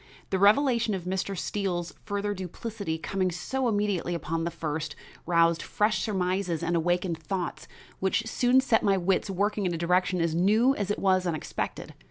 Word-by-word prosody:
The 190 - +1
revelation 230 +1 +4
of 185 - -5
Mr. 190 +1 -2
Steele's 180 -3 -2
further 205 0 -1
duplicity, 190 -1 -5
coming 185 +3 -1
so 260 +9 -2
immediately 205 -5 0
upon 165 0 -2
the - - 0
first, 155 -2 -4 0.3
roused 170 -1 +3
fresh 210 +1 0
surmises 185 -4 -1
and 170 +1 0
awakened 175 0 0
thoughts 175 +2 -4 0.3
which 190 +4 +1
soon 245 +3 +3
set 230 -4 +2
my 195 -2 +3
wits 190 +2 +1
working 200 +1 0
in 175 - -1
a - - -3
direction 180 +2 +1
as 165 -1 +1
new 215 +10 +4
as 205 -2 -3
it 205 - 0
was 185 -2 +2
unexpected. 160 -3 -4
190 Hz, 170 wpm, -27 LUFS, 170-205 Hz, 0.3 s, revelation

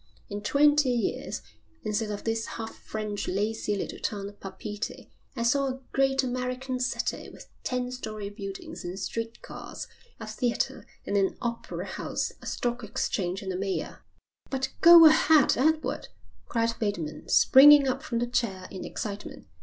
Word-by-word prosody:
In 205 0 -4
twenty 290 +4 +4
years, 215 -4 -2 0.4
instead 215 0 -1
of 205 -1 -5
this 225 0 -1
half 225 -1 -5
French, 210 -1 -5
lazy 210 +2 -1
little 200 - -4
town 200 -2 -3
of 205 - -17
Papeete 205 +2 -6 0.2
I 235 - -2
saw 275 +4 +2
a 260 0 -4
great 270 0 +3
American 255 +1 -3
city 250 - -2
with - - -13 0.2
ten 250 0 -2
story 215 -5 -6
buildings 195 -2 -7
and 175 +2 -5
street 230 +4 -4
cars, - - -8 0.3
a 220 - -6
theatre 235 +3 -2 0.2
and 200 - 0
an 195 -1 +1
opera 235 -1 -4
house, - - -3
a - - -9
stock 240 0 -2
exchange 195 -3 -2
and 190 -1 -3
a - - -3
mayor." 195 +1 -3 0.5
"But 265 -1 -1
go 335 -1 +10
ahead, 315 -2 +6
Edward," 310 +4 +1 0.4
cried 230 -1 0
Bateman, 170 -8 -3
springing 285 +1 +8
up 260 - -1
from 235 - -3
the 240 - +1
chair 225 -6 -2
in 190 - -6
excitement. 205 -1 -6
230 Hz, 155 wpm, -28 LUFS, 205-255 Hz, 0.5 s, go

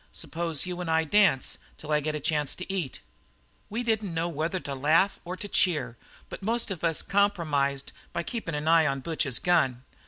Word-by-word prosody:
Suppose 165 0 -2
you 180 0 -4
and 175 - -4
I 160 0 +3
dance 165 -4 +3 0.2
till 155 - -7
I 150 - +4
get 150 +1 -2
a - - -2
chance 150 -1 0
to 185 +1 -5
eat?' 170 -10 -3 0.7
"We 230 +4 -2
didn't 220 -6 0
know 165 +1 0
whether 165 +3 -2
to 140 - -4
laugh 155 +8 +3
or 180 +1 -5
to 205 - -6
cheer, 165 - +1 0.3
but - - -8
most 225 +2 0
of 180 -4 -5
us 165 -2 +2
compromised 155 -9 +1 0.2
by 170 - -2
keeping 175 -7 -4
an 150 +1 -3
eye 165 -1 +5
on 135 -1 -1
Butch's 155 -5 -1
gun. 130 -9 +2
165 Hz, 195 wpm, -28 LUFS, 150-185 Hz, 0.7 s, eye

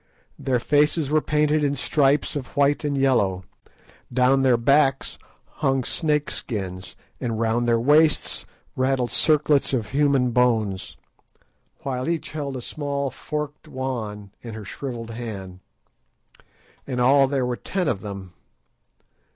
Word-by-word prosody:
Their 130 -2 +1
faces 150 +2 +2
were 155 0 +3
painted 150 0 +1
in 145 -1 +1
stripes 145 0 +1
of 140 -2 -6
white 145 +2 +3
and 145 -1 -1
yellow; 105 -9 +2 0.7
down 130 +2 +3
their 130 -2 +4
backs 135 +3 +2 0.4
hung 135 -2 +2
snake 150 +1 0
skins, 95 -6 -5 0.2
and 115 -3 -3
round 115 +1 +1
their 115 -1 +3
waists 150 +5 +3 0.3
rattled 130 -1 0
circlets 150 -3 +2
of 110 -4 -3
human 140 -3 +2
bones, 110 -6 0 0.9
while 130 +1 -2
each 170 -2 -2
held 145 -3 -4
a 125 - -5
small 140 -2 -3
forked 150 0 -5
wand 115 -8 -5
in 115 -2 -8
her 110 -2 -8
shrivelled 115 0 -6
hand. 100 -6 -7 1.3
In 125 -2 -3
all 135 +2 +5
there 135 -2 0
were 125 0 -1
ten 185 +6 -2
of 105 -8 -1
them. 100 -4 -8
130 Hz, 135 wpm, -23 LUFS, 115-145 Hz, 1.3 s, all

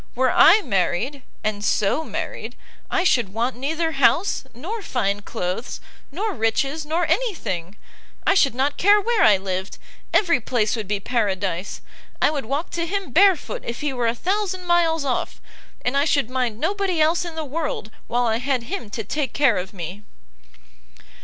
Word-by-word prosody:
were 255 +1 +2
I 410 +6 +7
married, 220 +5 -1 0.2
and 210 -1 -2
so 210 +9 +1
married, - - -5 0.3
I 375 - +1
should 235 - +2
want 240 +2 0
neither 320 +6 -1
house, 340 0 +2
nor 390 - -5
fine 205 - -1
cloaths, 185 +3 -4 0.3
nor 410 +8 -2
riches, 275 +7 0
nor 335 +3 +1
any 395 +7 +1
thing; 180 - -4 0.5
I - - +5
should 275 - +3
not 275 +3 0
care 410 +3 +5
where 450 +1 +1
I 205 -3 +6
lived, 190 0 -4 0.3
every 335 - +3
place 220 -1 0
would 220 -4 -5
be 205 0 -1
paradise! 195 -5 -2 0.4
I - - +3
would 285 -6 -3
walk 280 +8 -3
to 335 0 -2
him 390 -4 -3
barefoot 375 +1 +3
if 235 - -5
he 295 -2 -1
were 245 -2 0
a 230 - +1
thousand 375 - -1
miles 330 -3 +2
off, 260 - -2 0.5
and 245 +2 +1
I 280 +1 +3
should 280 -6 +1
mind 245 -4 -1
nobody 380 +1 0
else 320 +3 +3
in 340 -2 -7
the 320 -1 -3
world 290 -6 -3 0.2
while 245 +1 +1
I 225 -1 +1
had 255 0 -1
him 330 - -5
to 225 +2 -4
take 275 +7 -2
care 270 -7 +3
of 185 +1 -6
me!" 180 +1 -7
270 Hz, 175 wpm, -22 LUFS, 220-335 Hz, 0.5 s, I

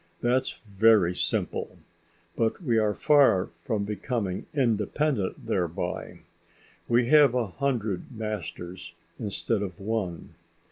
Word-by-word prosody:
That's 130 +2 +1
very 100 -3 +4
simple. - - -1 0.6
But 115 -1 0
we 120 -6 +2
are 105 -2 +1
far 135 -11 +4 0.2
from 105 -3 0
becoming 105 -2 -3
independent 120 -2 0
thereby. 85 -3 -3 0.7
We 120 +1 +3
have 145 -4 +6
a 125 -2 +1
hundred 110 -1 -2
masters 90 -6 -6 0.2
instead 110 0 -1
of 95 -4 -5
one. 100 -4 -3
110 Hz, 105 wpm, -27 LUFS, 95-120 Hz, 0.7 s, have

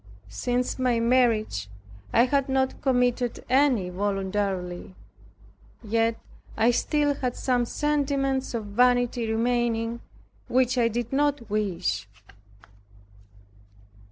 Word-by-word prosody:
Since 245 - -2
my 250 -2 +2
marriage 230 - +1 0.4
I 235 - +5
had 275 +1 0
not 265 0 0
committed 245 -2 0
any 255 -9 +2
voluntarily. 190 - -2 0.9
Yet 225 +1 0 0.4
I 225 +2 +4
still 290 +4 +1
had 255 -3 -3
some 245 -2 0
sentiments 275 -2 -1
of 225 -2 -3
vanity 245 +1 +2
remaining, 235 0 0 0.5
which 255 0 +2
I 240 -2 +3
did 240 +2 -3
not 285 -4 +1
wish. 180 - -1
240 Hz, 100 wpm, -26 LUFS, 215-260 Hz, 0.9 s, I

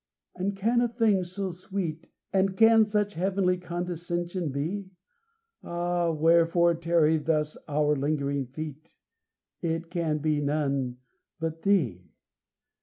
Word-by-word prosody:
And 195 +2 -2
can 230 +5 +2
a 240 - +3
thing 225 -5 +2
so 185 +2 -4
sweet, 180 -3 -5 0.2
And 190 0 +2
can 225 -1 +6
such 210 -1 0
heavenly 185 0 +1
condescension 175 -1 -3
be? 180 +8 -3 0.7
Ah! 175 0 -1
wherefore 165 +2 +4
tarry 165 -1 +2
thus 150 0 0
our 150 0 +2
lingering 140 -1 -1
feet? 155 +3 -8 0.7
It 165 0 -2
can 165 -4 0
be 150 0 0
none 140 -4 -1 0.4
but 165 0 -3
Thee. 125 - +1
170 Hz, 115 wpm, -27 LUFS, 155-185 Hz, 0.7 s, can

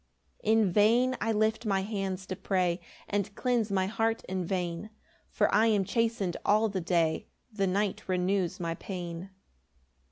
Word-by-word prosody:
4 215 - +2
"In 220 -4 +4
vain 235 +6 +4
I 225 - +1
lift 220 +1 +1
my 195 -4 +1
hands 195 -2 -3
to 190 - -4
pray, 185 -2 0 0.3
"And 200 -1 -2
cleanse 240 -4 +1
my 190 -1 +2
heart 225 +3 0
in 185 0 -2
vain, 175 +2 -3 0.4
"For - - +1
I 220 +3 +5
am 210 -3 +3
chasten'd 225 -4 0
all 215 +2 +3
the 195 -2 -2
day, 165 -2 +1 0.3
"The 195 -2 +1
night 195 +1 0
renews 185 0 0
my 165 -1 -2
pain.' 175 0 -6
195 Hz, 160 wpm, -29 LUFS, 185-215 Hz, 0.4 s, I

